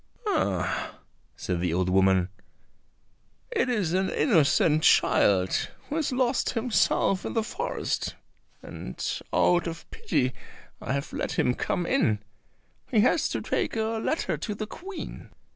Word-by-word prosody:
"Ah," 95 - -1 0.4
said 90 -2 -3
the 90 -2 0
old 90 0 +1
woman, 95 -1 +3 1.2
"it 450 - +1
is 205 -9 0
an 190 +1 +1
innocent 155 0 +3
child 95 -10 +3 0.2
who 295 - -3
has 310 -4 0
lost 255 0 +1
himself 225 -5 +1
in - - -4
the 225 - +1
forest, - - -3 0.5
and - - -8 0.3
out 175 0 +3
of 165 -1 -7
pity 130 0 0 0.5
I - - -2
have 140 0 -3
let - - -2
him 125 - +2
come 180 +7 -2
in; 245 - +2 0.7
he 225 -6 +4
has 255 +8 +3
to - - -2
take - - -1
a 220 0 -1
letter 320 - -1
to 210 - -4
the 215 - -4
Queen." 375 - -8
185 Hz, 140 wpm, -27 LUFS, -, 1.2 s, he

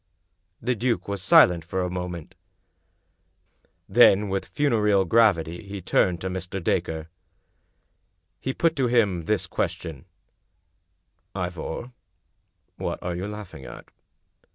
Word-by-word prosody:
The 125 +2 0
duke 120 +1 -1
was 100 -2 -3
silent 90 -3 +6
for 95 +3 -3
a 90 - -2
moment. 90 -3 -5 1.5
Then 105 -2 +5
with 95 0 -2
funereal 105 -9 +2
gravity 85 -5 +3
he 100 -1 -7
turned 90 -1 +1
to 95 - -3
Mr. 95 +1 -4
Dacre. 80 -1 -1 1.3
He 130 - -2
put 165 +4 +1
to 130 -2 +2
him 105 -8 +2
this - - 0
question: 80 0 -4 0.7
" - - -48
Ivor, 90 +5 -4 0.9
what - - -3
are 90 0 -3
you 90 +3 -4
laughing 105 -9 -8
at?" - - -11
95 Hz, 120 wpm, -25 LUFS, 85-110 Hz, 1.5 s, silent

